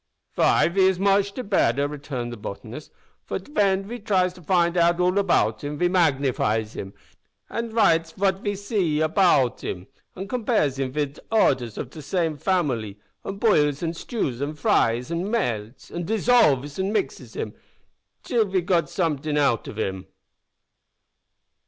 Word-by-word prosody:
"Vy, -, -, +3 dB
ve 190 Hz, +2 st, +3 dB
is 190 Hz, -1 st, +2 dB
moche 200 Hz, 0 st, +3 dB
de 255 Hz, -, -6 dB
better," 145 Hz, -, +2 dB
returned 140 Hz, -5 st, -5 dB
the -, -, -5 dB
botanist, 110 Hz, +6 st, -8 dB, 0.3 s
"for -, -, -3 dB
den 195 Hz, -9 st, 0 dB
ve 235 Hz, +5 st, -7 dB
tries 185 Hz, -4 st, +1 dB
to 180 Hz, -, -15 dB
find 175 Hz, 0 st, +2 dB
out 170 Hz, 0 st, +3 dB
all 180 Hz, +2 st, +2 dB
about 195 Hz, -5 st, +1 dB
him. 145 Hz, +1 st, -4 dB
Ve 175 Hz, -, +2 dB
magnifies 135 Hz, -, +1 dB
him, 95 Hz, -, -6 dB, 0.6 s
an' 230 Hz, 0 st, -3 dB
writes 165 Hz, -7 st, +2 dB
vat 190 Hz, -1 st, 0 dB
ve 205 Hz, 0 st, -2 dB
zee 195 Hz, -6 st, -1 dB
about 155 Hz, -, +2 dB
him, 90 Hz, 0 st, -5 dB, 0.3 s
an' 190 Hz, +2 st, -6 dB
compares 210 Hz, -, 0 dB
him 130 Hz, -1 st, -1 dB
vid 145 Hz, 0 st, -3 dB
oders 125 Hz, -, +2 dB
of -, -, -5 dB
de 155 Hz, -, -9 dB
same 165 Hz, +1 st, -1 dB
family, 135 Hz, -, -1 dB, 0.3 s
an' 195 Hz, -, -5 dB
boils, 150 Hz, -9 st, +2 dB
an' 165 Hz, 0 st, -1 dB
stews, 155 Hz, -, -3 dB
an' 145 Hz, +2 st, -3 dB
fries, 125 Hz, -2 st, +1 dB
an' 170 Hz, +4 st, -2 dB
melts, 120 Hz, -, -3 dB
an' 175 Hz, -, -4 dB
dissolves, 165 Hz, -, +2 dB
an' 190 Hz, +1 st, 0 dB
mixes 215 Hz, -, -3 dB
him, -, -, -4 dB, 0.7 s
till 235 Hz, -3 st, +1 dB
ve 190 Hz, -1 st, 0 dB
gits 170 Hz, -3 st, 0 dB
somet'ing 155 Hz, -4 st, -1 dB
out 140 Hz, -6 st, +1 dB
of -, -, -8 dB
him." 95 Hz, -3 st, -3 dB
170 Hz, 160 wpm, -24 LUFS, 140-195 Hz, 0.7 s, Vy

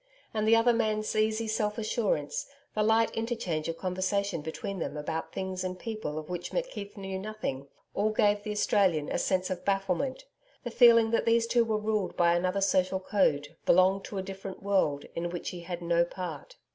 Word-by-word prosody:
And 215 Hz, -1 st, 0 dB
the 225 Hz, -, +7 dB
other 230 Hz, +1 st, +4 dB
man's 215 Hz, -2 st, 0 dB
easy 220 Hz, +1 st, +1 dB
self 210 Hz, -1 st, -1 dB
assurance, 210 Hz, -10 st, -1 dB, 0.3 s
the 215 Hz, -, 0 dB
light 220 Hz, +1 st, +3 dB
interchange 225 Hz, -9 st, -2 dB
of 165 Hz, -, -3 dB
conversation 185 Hz, -1 st, -1 dB
between 190 Hz, +5 st, -5 dB
them 150 Hz, -, -3 dB
about 160 Hz, +2 st, -4 dB
things 190 Hz, -1 st, -3 dB
and 185 Hz, 0 st, -3 dB
people 215 Hz, -9 st, -5 dB
of 155 Hz, -1 st, -5 dB
which 175 Hz, -1 st, -5 dB
McKeith -, -, -4 dB
knew 190 Hz, -1 st, -4 dB
nothing 190 Hz, -10 st, -4 dB, 0.3 s
all 210 Hz, +2 st, +1 dB
gave 205 Hz, -1 st, +2 dB
the 210 Hz, -, -6 dB
Australian 195 Hz, -7 st, +2 dB
a -, -, -1 dB
sense 185 Hz, 0 st, 0 dB
of 180 Hz, -1 st, -4 dB
bafflement 195 Hz, -, -1 dB, 0.4 s
the 240 Hz, -, -4 dB
feeling 230 Hz, -2 st, +6 dB
that 230 Hz, -, +1 dB
these 230 Hz, 0 st, +4 dB
two 235 Hz, 0 st, +3 dB
were 220 Hz, -2 st, 0 dB
ruled 215 Hz, -2 st, -1 dB
by 170 Hz, -1 st, +4 dB
another 185 Hz, +3 st, 0 dB
social 190 Hz, -1 st, +2 dB
code, 165 Hz, -6 st, +1 dB
belonged 190 Hz, +2 st, +4 dB
to 200 Hz, -, -6 dB
a 190 Hz, -, -2 dB
different 195 Hz, 0 st, -8 dB
world, 190 Hz, -8 st, +1 dB
in 170 Hz, +1 st, -2 dB
which 175 Hz, 0 st, -4 dB
he 180 Hz, -, -7 dB
had 175 Hz, 0 st, -6 dB
no 170 Hz, 0 st, +3 dB
part. 185 Hz, -, -6 dB
195 Hz, 190 wpm, -29 LUFS, 175-215 Hz, 0.4 s, the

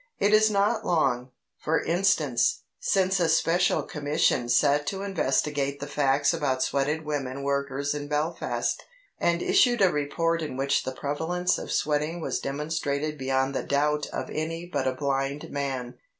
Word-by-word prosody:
It 205 Hz, +1 st, +2 dB
is 215 Hz, 0 st, +6 dB
not 210 Hz, +2 st, +1 dB
long, 130 Hz, -8 st, +1 dB, 0.3 s
for 160 Hz, +1 st, +1 dB
instance, 165 Hz, -8 st, +1 dB, 0.2 s
since 190 Hz, -1 st, +1 dB
a 170 Hz, -2 st, +2 dB
Special 170 Hz, +3 st, +2 dB
Commission 145 Hz, -4 st, 0 dB
sat 145 Hz, +3 st, +3 dB
to 195 Hz, 0 st, -3 dB
investigate 140 Hz, -6 st, 0 dB
the 145 Hz, -, -4 dB
facts 145 Hz, +1 st, +2 dB
about 135 Hz, -5 st, 0 dB
sweated 145 Hz, +4 st, -1 dB
women 140 Hz, -2 st, -3 dB
workers 140 Hz, 0 st, -1 dB
in 145 Hz, -1 st, -5 dB
Belfast, 150 Hz, +3 st, -1 dB, 0.4 s
and 170 Hz, 0 st, +1 dB
issued 240 Hz, -1 st, +4 dB
a 190 Hz, -3 st, +5 dB
report 165 Hz, +3 st, 0 dB
in 150 Hz, -5 st, -4 dB
which 140 Hz, +1 st, +1 dB
the 130 Hz, -, -2 dB
prevalence 160 Hz, +7 st, -1 dB
of -, -, -6 dB
sweating 150 Hz, +3 st, 0 dB
was 160 Hz, -, -2 dB
demonstrated 150 Hz, +1 st, -2 dB
beyond 135 Hz, -1 st, 0 dB
the -, -, -1 dB
doubt 150 Hz, +1 st, 0 dB
of -, -, -5 dB
any 165 Hz, +2 st, -3 dB
but 155 Hz, -6 st, -2 dB
a 130 Hz, -, 0 dB
blind 140 Hz, +1 st, -2 dB
man. 135 Hz, -3 st, -4 dB
150 Hz, 155 wpm, -26 LUFS, 140-165 Hz, 0.4 s, is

